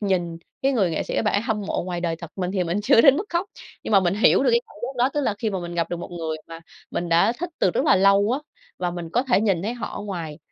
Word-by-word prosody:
nhìn 175 Hz, -5 st, -1 dB, 0.2 s
cái 275 Hz, +1 st, +3 dB
người 195 Hz, -8 st, +2 dB
nghệ 160 Hz, -, -1 dB
sĩ -, -, -5 dB
các -, -, +2 dB
bạn 210 Hz, -, 0 dB
ấy 205 Hz, -, +2 dB
hâm 220 Hz, -3 st, -1 dB
mộ 195 Hz, -, -2 dB
ngoài 175 Hz, -1 st, -4 dB
đời 170 Hz, -1 st, -1 dB
thật. 170 Hz, -1 st, -9 dB
Mình 180 Hz, -1 st, -2 dB
thì 185 Hz, -2 st, 0 dB
mình 175 Hz, +4 st, -1 dB
chưa 220 Hz, -, +6 dB
đến 275 Hz, +1 st, +7 dB
mức 380 Hz, -, -2 dB
khóc, 345 Hz, +2 st, -1 dB, 0.4 s
nhưng -, -, -4 dB
mà 200 Hz, -, +7 dB
mình 180 Hz, 0 st, +1 dB
hiểu 210 Hz, -, +4 dB
được -, -, +3 dB
cái 470 Hz, 0 st, +4 dB
cảm 420 Hz, -, -18 dB
giác 255 Hz, +1 st, -4 dB
đó. 260 Hz, -, +3 dB
Tức 295 Hz, -, +1 dB
là 215 Hz, -7 st, 0 dB
khi 220 Hz, -1 st, -1 dB
mà 190 Hz, -2 st, -3 dB
mình 175 Hz, 0 st, -6 dB
gặp 170 Hz, -1 st, -1 dB
được 175 Hz, -, -2 dB
một 175 Hz, -, -7 dB
người 160 Hz, -2 st, -4 dB
mà 165 Hz, 0 st, -9 dB, 0.3 s
mình 175 Hz, 0 st, -3 dB
đã 170 Hz, +7 st, +4 dB
thích 355 Hz, +1 st, -4 dB
từ 185 Hz, -, +3 dB
rất -, -, 0 dB
là -, -, +5 dB
lâu 200 Hz, +2 st, +4 dB
á, 265 Hz, -, 0 dB, 0.4 s
và 180 Hz, -, -1 dB
mình 175 Hz, -2 st, -6 dB
có 245 Hz, -, +2 dB
thể 250 Hz, -6 st, +2 dB
nhìn 195 Hz, -5 st, +1 dB
thấy 230 Hz, +4 st, -2 dB
họ 240 Hz, -, -5 dB
ở -, -, -6 dB
ngoài, 170 Hz, -7 st, -5 dB
195 Hz, 320 wpm, -23 LUFS, 175-230 Hz, 0.4 s, đến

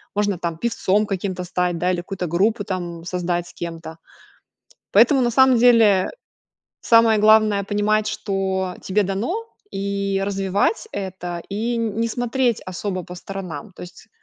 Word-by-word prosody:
Можно 205 Hz, -3 st, 0 dB
там 170 Hz, -2 st, -3 dB
певцом 210 Hz, 0 st, +1 dB
каким-то 190 Hz, -2 st, -3 dB
стать, 180 Hz, -1 st, -1 dB
да, 180 Hz, +2 st, +1 dB
или 180 Hz, -, -1 dB
какую-то 180 Hz, +1 st, -4 dB
группу 205 Hz, +6 st, +1 dB
там 175 Hz, -4 st, -5 dB
создать 175 Hz, -1 st, -2 dB
с -, -, -14 dB
кем-то. 165 Hz, -1 st, -7 dB, 0.9 s
Поэтому, 280 Hz, -4 st, +5 dB
на 240 Hz, -1 st, +1 dB
самом 260 Hz, +1 st, +5 dB
деле, 225 Hz, -5 st, +5 dB, 0.7 s
самое 230 Hz, -1 st, +5 dB
главное 215 Hz, -1 st, +4 dB
понимать, 210 Hz, +1 st, +1 dB
что 190 Hz, -3 st, -2 dB
тебе 205 Hz, +2 st, +1 dB
дано, 220 Hz, -, -2 dB, 0.3 s
и 200 Hz, 0 st, -2 dB
развивать 200 Hz, -, 0 dB
это, 180 Hz, -3 st, -5 dB
и 225 Hz, +4 st, -1 dB
не 230 Hz, 0 st, -1 dB
смотреть 245 Hz, 0 st, 0 dB
особо 185 Hz, 0 st, -4 dB
по 180 Hz, -, -9 dB
сторонам. 190 Hz, +1 st, -7 dB
То -, -, -11 dB
есть, 180 Hz, 0 st, -12 dB
195 Hz, 145 wpm, -21 LUFS, 180-215 Hz, 0.9 s, Поэтому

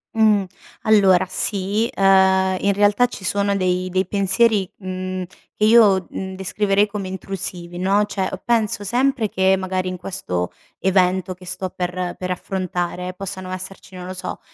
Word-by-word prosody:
Mh, 215 Hz, -3 st, +4 dB, 0.4 s
allora 190 Hz, -4 st, +5 dB
sì, 205 Hz, +4 st, -1 dB
uhm 190 Hz, -1 st, +5 dB, 0.2 s
in 200 Hz, 0 st, +3 dB
realtà 205 Hz, +4 st, +4 dB
ci 200 Hz, -, -10 dB
sono 200 Hz, +1 st, +1 dB
dei 185 Hz, -1 st, 0 dB
dei 185 Hz, +1 st, 0 dB
pensieri, 200 Hz, +1 st, +2 dB
mhmm, 185 Hz, -1 st, -4 dB, 0.3 s
che 210 Hz, -, -2 dB
io, 210 Hz, -5 st, +6 dB
mhmm, 190 Hz, 0 st, -5 dB
descriverei 195 Hz, +2 st, +1 dB
come 200 Hz, -2 st, -5 dB
intrusivi 185 Hz, -2 st, -6 dB
no, 195 Hz, +3 st, +2 dB
cioè, 195 Hz, -2 st, -2 dB
penso 220 Hz, -3 st, +1 dB
sempre 245 Hz, 0 st, +1 dB
che 190 Hz, 0 st, +3 dB
magari, 185 Hz, 0 st, -2 dB
in 185 Hz, -, -3 dB
questo 90 Hz, -, -3 dB, 0.3 s
evento 185 Hz, -1 st, +2 dB
che 180 Hz, 0 st, -15 dB
sto 185 Hz, +1 st, -4 dB
per 180 Hz, 0 st, -3 dB
per 185 Hz, 0 st, -4 dB
affrontare, 180 Hz, -1 st, -3 dB
possano 185 Hz, -1 st, -6 dB
esserci 185 Hz, +1 st, -8 dB
non 180 Hz, 0 st, -7 dB
lo 185 Hz, -, -5 dB
so, 185 Hz, 0 st, -6 dB
190 Hz, 155 wpm, -21 LUFS, 185-200 Hz, 0.4 s, io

